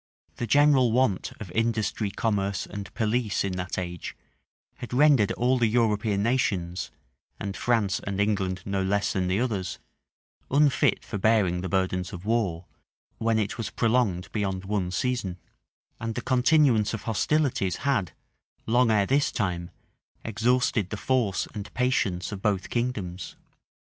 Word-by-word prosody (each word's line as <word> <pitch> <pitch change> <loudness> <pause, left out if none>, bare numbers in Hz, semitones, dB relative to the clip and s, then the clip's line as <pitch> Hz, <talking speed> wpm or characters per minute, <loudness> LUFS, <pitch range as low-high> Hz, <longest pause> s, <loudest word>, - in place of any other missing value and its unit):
The 120 - -3
general 140 -4 +5
want 115 -6 +1
of 95 -5 -8
industry, 110 -1 0
commerce, 100 -2 -1
and 100 -1 -7
police 110 -1 0
in 100 - -1
that 90 0 -4
age, 90 -2 -5 0.6
had 120 - -8
rendered 135 -7 +5
all 125 +2 +1
the 120 - +3
European 105 -3 +1
nations, 95 -8 0 0.5
and 100 -1 -4
France 110 -5 +1
and 100 -1 -4
England 95 -3 0
no 100 -1 -1
less 100 +2 0
than 95 -1 0
the 95 +3 +1
others, 110 -7 -2 0.7
unfit 145 0 +3
for 105 - -4
bearing 95 -4 +2
the 95 - -4
burdens 95 -1 -1
of 90 +1 -8
war, 100 -7 0 0.5
when 115 0 +1
it 110 +1 -2
was 115 - -2
prolonged 115 -6 0
beyond 95 -3 -2
one 95 -3 -1
season; 100 -3 -2 0.6
and 115 -1 -4
the - - -2
continuance 125 -4 +3
of 115 - -8
hostilities 120 -4 +1
had, 110 -12 +1 0.5
long 120 +1 +3
ere 105 -2 +3
this 140 +6 +2
time, 85 -3 -2 0.6
exhausted 115 -2 +1
the 110 - -4
force 120 -5 0
and 105 -1 -7
patience 110 -9 0
of 100 -2 -6
both 100 -3 -1
kingdoms. 105 -7 -3
105 Hz, 145 wpm, -26 LUFS, 95-120 Hz, 0.7 s, general